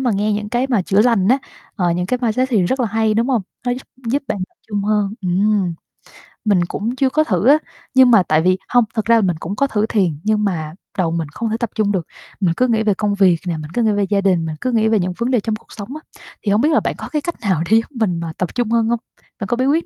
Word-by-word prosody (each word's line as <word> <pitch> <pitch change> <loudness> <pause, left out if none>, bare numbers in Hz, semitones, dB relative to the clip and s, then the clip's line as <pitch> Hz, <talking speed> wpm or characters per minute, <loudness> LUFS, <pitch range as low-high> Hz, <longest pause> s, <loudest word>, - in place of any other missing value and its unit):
mà 255 -2 +1
nghe 210 +2 0
những 210 0 -2
cái 245 +3 0
mà 240 -7 +1
chữa 195 +3 +2
lành 225 -5 +3
á, 260 - +4 0.4
ờ, 175 -3 +1
những 180 +1 -1
cái 250 - 0
mindset 250 +3 +1
thì 215 -7 +3
rất 260 +9 0
là 245 - +2
hay, 220 0 +1
đúng 230 +4 +1
hông? 240 -6 +1 0.2
Nó 245 - +2
giúp 255 +2 -5 0.2
giúp 275 +5 0
bạn 205 - -1
tập - - -39
trung 205 -2 -2
hơn. 210 -1 +1
Ừm. 190 0 +1 0.7
Mình 185 -4 +3
cũng 225 +8 -3
chưa 265 -1 +2
có 310 +3 +2
thử 195 - 0
á, 290 +3 +7 0.4
nhưng 260 -1 +6
mà 210 -6 +6
tại 155 -1 +2
vì 185 +2 +3
hông, 245 -1 +4
thật 220 -3 -1
ra 230 0 +5
là 225 - +4
mình 180 -5 0
cũng 180 +6 -4
có 280 +5 +1
thử 210 -4 0
thiền, 185 -10 0
nhưng 215 0 +1
mà 160 -6 -2 0.2
đầu 175 -4 +1
mình 165 -2 -2
không 220 +9 -3
thể 220 - -1
tập 235 - -1
trung 215 -2 +1
được, 180 -5 -2 0.3
mình 180 -5 +2
cứ 255 - +3
nghĩ 220 -2 +1
về 210 -2 +3
công 205 +1 -1
việc 185 -4 +4
nè, 170 -2 -1
mình 155 0 -8
cứ 240 - +1
nghĩ 220 - +3
về 205 0 +1
gia 200 -1 +2
đình, 180 -4 +2
mình 155 - -4
cứ 255 - 0
nghĩ 220 -2 +2
về 220 -1 +3
những 180 0 -1
vấn 240 +3 -1
đề 245 - +3
trong 215 +1 -2
cuộc 215 - -14
sống 205 0 -8
á. 310 - -8 0.4
Thì 200 - +2
hông 210 - +3
biết 300 - +3
là - - +5
bạn - - -2
có - - -7
cái 300 - -1
cách 345 +3 -4
nào 190 -7 +1
để 220 - +7
giúp 225 - -1
mình 180 -7 +1
mà 165 -1 -5
tập 180 - -3
trung 240 -3 0
hơn 230 -1 +2
hông? 235 0 +1 0.4
Bạn 200 - -4
có 240 - -1
bí 255 - +1
quyết 315 +4 +2
215 Hz, 300 wpm, -19 LUFS, 185-235 Hz, 0.7 s, á